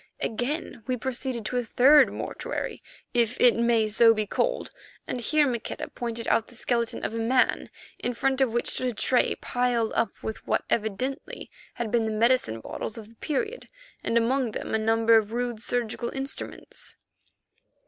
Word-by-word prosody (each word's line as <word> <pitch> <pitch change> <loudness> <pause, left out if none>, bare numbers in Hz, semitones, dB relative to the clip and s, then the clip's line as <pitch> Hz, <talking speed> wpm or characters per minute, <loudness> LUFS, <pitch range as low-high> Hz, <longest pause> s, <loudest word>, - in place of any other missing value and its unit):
Again 245 +1 -3
we 255 -1 0
proceeded 250 -1 -3
to 250 - -1
a 245 - +1
third 270 +6 +6
mortuary, - - -4 0.3
if 240 0 +2
it 245 -2 +6
may 230 -1 +3
so 225 +2 +5
be 215 0 0
called, - - -1 0.3
and 245 - -4
here 300 +5 +3
Maqueda 235 -3 -4
pointed 235 -1 -5
out 225 - +2
the 240 - -15
skeleton 235 -1 -1
of - - -3
a 230 - -2
man, 250 +3 +2 0.3
in 245 0 -2
front 270 +1 +1
of 260 -3 +3
which 240 +1 0
stood 255 - -1
a 245 - -1
tray 250 +4 +2
piled 245 -2 0
up 230 - +1
with 220 - -6
what - - +1
evidently 235 - -2 0.2
had 230 -3 -3
been 230 -1 +2
the 220 - -1
medicine 220 - +2
bottles 220 - -5
of 220 -1 -9
the 230 - -19
period 430 - -3 0.3
and 230 - +1
among 240 0 +1
them - - -4
a 220 - +2
number 225 +1 +4
of 220 0 0
rude 240 -2 -2
surgical 235 0 -2
instruments. 270 0 -7
235 Hz, 175 wpm, -26 LUFS, 225-255 Hz, 0.3 s, third